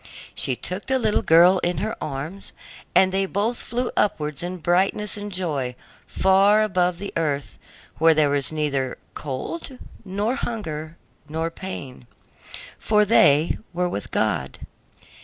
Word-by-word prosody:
She 130 Hz, -, +1 dB
took 185 Hz, +9 st, -5 dB
the 265 Hz, -, +2 dB
little 220 Hz, -4 st, +1 dB
girl 175 Hz, +3 st, +6 dB
in 175 Hz, -1 st, -1 dB
her 215 Hz, +6 st, -2 dB
arms, 155 Hz, +7 st, -6 dB, 0.4 s
and 190 Hz, 0 st, +5 dB
they 195 Hz, +1 st, 0 dB
both 210 Hz, +5 st, -1 dB
flew 245 Hz, +2 st, -3 dB
upwards 150 Hz, -8 st, 0 dB
in 180 Hz, +1 st, -4 dB
brightness 190 Hz, +5 st, +1 dB
and 205 Hz, 0 st, -6 dB
joy 150 Hz, -9 st, -2 dB, 0.3 s
far 195 Hz, +3 st, +4 dB
above 180 Hz, -4 st, +1 dB
the 200 Hz, +2 st, -6 dB
earth, 145 Hz, -4 st, -2 dB, 0.4 s
where 160 Hz, 0 st, +5 dB
there 150 Hz, -2 st, +3 dB
was 140 Hz, -1 st, 0 dB
neither 140 Hz, -4 st, -1 dB, 0.2 s
cold 205 Hz, -, -5 dB, 0.3 s
nor 205 Hz, +4 st, -1 dB
hunger 165 Hz, -, -4 dB, 0.3 s
nor 160 Hz, +2 st, -2 dB
pain, 140 Hz, -10 st, -8 dB, 0.7 s
for 210 Hz, -1 st, +3 dB
they 155 Hz, -7 st, +4 dB, 0.2 s
were 180 Hz, +1 st, 0 dB
with 105 Hz, -12 st, -5 dB
God. 65 Hz, 0 st, -1 dB
180 Hz, 140 wpm, -23 LUFS, 150-205 Hz, 0.7 s, girl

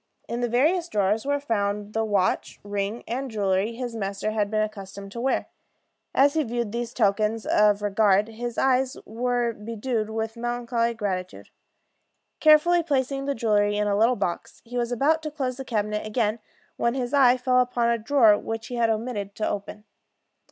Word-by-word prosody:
In 235 Hz, +1 st, -3 dB
the 240 Hz, -, 0 dB
various 325 Hz, +9 st, +2 dB
drawers 210 Hz, -, 0 dB
were 285 Hz, 0 st, +1 dB
found 210 Hz, -5 st, -2 dB
the 225 Hz, -, 0 dB
watch, 205 Hz, -4 st, 0 dB
rings, 205 Hz, +2 st, -3 dB
and 260 Hz, +3 st, -3 dB
jewelry 200 Hz, 0 st, 0 dB
his 245 Hz, -1 st, -5 dB
master 200 Hz, 0 st, -2 dB
had 210 Hz, -2 st, 0 dB
been 215 Hz, 0 st, +1 dB
accustomed 200 Hz, -2 st, -7 dB
to 235 Hz, -, -6 dB
wear. 265 Hz, +2 st, 0 dB, 0.7 s
As 280 Hz, +1 st, +5 dB
he 320 Hz, -, +2 dB
viewed 235 Hz, -4 st, -2 dB
these 235 Hz, +1 st, -3 dB
tokens 215 Hz, 0 st, +1 dB
of 210 Hz, -1 st, +3 dB
regard, 205 Hz, 0 st, +3 dB
his 235 Hz, +1 st, -6 dB
eyes 260 Hz, 0 st, +2 dB
were 240 Hz, +1 st, -1 dB
bedewed 220 Hz, +1 st, -3 dB
with 220 Hz, +1 st, -3 dB
melancholy 235 Hz, 0 st, -1 dB
gratitude. 185 Hz, -4 st, -4 dB, 0.9 s
Carefully 310 Hz, +3 st, +5 dB
placing 275 Hz, -3 st, -1 dB
the 280 Hz, 0 st, -1 dB
jewelry 205 Hz, -2 st, +2 dB
in 210 Hz, -, +1 dB
a 200 Hz, -, +1 dB
little 230 Hz, +4 st, +3 dB
box, 175 Hz, -6 st, -4 dB
he 240 Hz, +1 st, -9 dB
was 240 Hz, 0 st, -1 dB
about 295 Hz, +7 st, +2 dB
to 310 Hz, -, -4 dB
close 265 Hz, -4 st, -3 dB
the 270 Hz, -, -5 dB
cabinet 210 Hz, -3 st, -1 dB
again, 215 Hz, 0 st, -1 dB, 0.4 s
when 235 Hz, +1 st, 0 dB
his 250 Hz, -1 st, -3 dB
eye 255 Hz, -3 st, +5 dB
fell 250 Hz, 0 st, +2 dB
upon 245 Hz, -1 st, +1 dB
a 235 Hz, -, 0 dB
drawer 225 Hz, -3 st, +4 dB
which 225 Hz, 0 st, -5 dB
he 245 Hz, -, -4 dB
had 230 Hz, -1 st, +2 dB
omitted 215 Hz, -3 st, -3 dB
to 215 Hz, -, -1 dB
open. 205 Hz, +1 st, -5 dB
230 Hz, 180 wpm, -25 LUFS, 210-250 Hz, 0.9 s, As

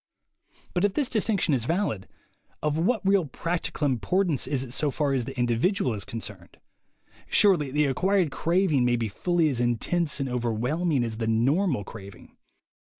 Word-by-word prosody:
But 180 Hz, -, 0 dB
if 205 Hz, -1 st, +1 dB
this 285 Hz, -4 st, +1 dB
distinction 205 Hz, -7 st, +1 dB
is 120 Hz, -4 st, 0 dB
valid, 165 Hz, -, -1 dB, 0.6 s
of 150 Hz, -1 st, +1 dB
what 195 Hz, +6 st, 0 dB
real 195 Hz, -3 st, +3 dB
prac 165 Hz, +6 st, -3 dB
tical -, -, -4 dB
importance 145 Hz, -, 0 dB
is 135 Hz, -2 st, 0 dB
it 125 Hz, -2 st, -6 dB
so 150 Hz, +2 st, +1 dB
far 140 Hz, 0 st, 0 dB
as 125 Hz, -3 st, 0 dB
the -, -, -8 dB
individual 120 Hz, -, +1 dB
is 100 Hz, -2 st, -5 dB
concerned? 105 Hz, -6 st, -7 dB, 0.7 s
Surely 175 Hz, -9 st, +4 dB
the 150 Hz, +3 st, +1 dB
acquired 180 Hz, +4 st, +1 dB
craving 165 Hz, -2 st, +1 dB
may 120 Hz, 0 st, +2 dB
be 115 Hz, -2 st, -2 dB
fully 170 Hz, -, +1 dB
as 125 Hz, -4 st, -1 dB
intense 150 Hz, +8 st, 0 dB
and 135 Hz, -, -1 dB
overwhelming 125 Hz, +5 st, 0 dB
as 115 Hz, -2 st, -4 dB
the 115 Hz, -1 st, -2 dB
"normal'' 130 Hz, -, +1 dB
craving. 100 Hz, -3 st, -12 dB
140 Hz, 165 wpm, -26 LUFS, 120-180 Hz, 0.7 s, Surely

